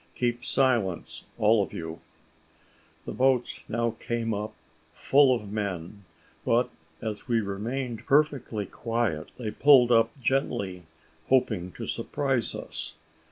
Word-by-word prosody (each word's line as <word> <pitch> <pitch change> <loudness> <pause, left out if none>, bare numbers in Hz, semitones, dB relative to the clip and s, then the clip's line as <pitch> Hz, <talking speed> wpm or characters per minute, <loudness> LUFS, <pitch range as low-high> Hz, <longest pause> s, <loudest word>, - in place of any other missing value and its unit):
Keep 120 0 -1
silence, 120 -11 0
all 105 0 +4
of 100 - -4
you." 80 0 -6 1.1
The - - -4
boats 130 -1 +1
now 115 0 0
came 115 -1 -2
up, 105 +1 -3 0.4
full 135 -2 +4
of 105 -4 -6
men; 100 -2 -4 0.4
but - - +2 0.3
as 110 +1 -4
we 120 -2 +2
remained 115 +4 -4
perfectly 140 -7 +2
quiet, 115 -11 -2
they 110 -4 -4
pulled 130 0 +6
up 115 -1 +5
gently, 115 - -1 0.4
hoping 110 -9 +2
to - - -6
surprise 135 -5 -1
us. - - -6
115 Hz, 120 wpm, -27 LUFS, 105-125 Hz, 1.1 s, pulled